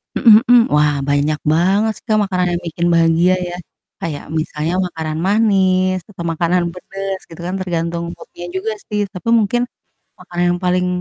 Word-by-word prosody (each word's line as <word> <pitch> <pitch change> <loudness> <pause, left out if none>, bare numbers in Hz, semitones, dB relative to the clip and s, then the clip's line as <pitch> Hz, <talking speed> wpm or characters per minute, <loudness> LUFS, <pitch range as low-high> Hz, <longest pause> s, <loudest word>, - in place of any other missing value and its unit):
Mhm 225 -2 +7
mhm. 245 -2 +6
Wah, 150 -1 +3
banyak 145 +1 +1
banget 190 +7 +2
sih - - -36
Kak, 215 -1 +3
makanan 185 -2 0
yang 175 - -3
bikin 170 +1 -1
bahagia 165 +2 +4
ya. 175 - -5 0.5
Kayak 155 -3 -4 0.2
misalnya 155 +1 -3
makanan 160 -2 -5
manis 190 -3 +2
atau 180 -4 -8
makanan 170 +2 +1
pedes 195 +1 -5
gitu 165 - -12
kan, 185 - -3
tergantung 170 -2 -2
mood-nya 175 - -11
juga 205 +4 -2 0.2
sih. 210 - 0
Tapi 185 +4 -4
mungkin 225 +3 +1 0.6
makanan 175 0 -3
yang 175 - -5
paling 180 0 +2
180 Hz, 165 wpm, -18 LUFS, 165-195 Hz, 0.6 s, Mhm